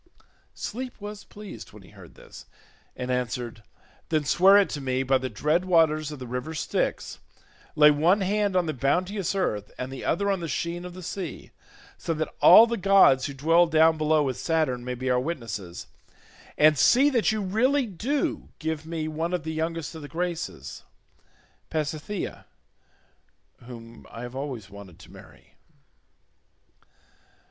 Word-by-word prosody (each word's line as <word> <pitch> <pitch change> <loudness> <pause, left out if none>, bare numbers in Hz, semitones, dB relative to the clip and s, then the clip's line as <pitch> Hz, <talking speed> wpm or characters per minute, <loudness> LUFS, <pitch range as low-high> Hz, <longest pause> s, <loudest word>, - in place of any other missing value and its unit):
Sleep 250 +2 -6
was 205 0 -8
pleased 205 -2 -11
when 105 -2 -14
he 95 - -17
heard 95 -5 -15
this, - - -14 0.5
and 125 0 -4
answered, 120 -2 -3 0.5
"Then 155 -2 0
swear 195 +6 +6
it 200 - +4
to 145 - -4
me 130 0 -1
by 135 0 +2
the 130 0 -4
dread 150 - 0
waters 155 -4 +2
of 150 - -7
the 130 - -8
river 125 +6 -5
Styx; - - -2 0.6
lay 150 0 +7
one 170 +7 +3
hand 200 0 0
on 180 -1 +2
the 155 - -2
bounteous 180 - -1
earth, 105 - -2
and 130 +1 -5
the 135 - -7
other 200 +4 0
on 195 - -1
the 170 - -4
sheen 170 +2 -3
of 180 0 -9
the 185 - -9
sea, 175 -3 -6 0.5
so 165 - -2
that 155 0 -3
all 225 - +9
the 235 0 -3
gods 190 -9 +5
who 140 - -7
dwell 165 +5 +4
down 160 0 +4
below 155 0 +3
with 130 -3 -2
Saturn 155 -7 0
may 125 0 -4
be 130 +1 -5
our 125 - +3
witnesses, 115 - -5 0.7
and 155 -1 +5
see 275 +4 +5
that 235 -4 +2
you 220 - -2
really 245 +8 +1
do 235 - -2
give 160 0 -4
me 160 -1 -3
one 160 +3 -3
of 175 - -4
the 160 0 -4
youngest 165 0 -3
of 160 - -9
the 145 - -8
Graces—Pasithea, 165 0 -6 1.2
whom 115 -2 -12
I 115 - -9
have 120 +1 -8
always 130 -7 -5
wanted 100 -4 -13
to - - -16
marry." - - -17
160 Hz, 165 wpm, -26 LUFS, 130-185 Hz, 1.2 s, all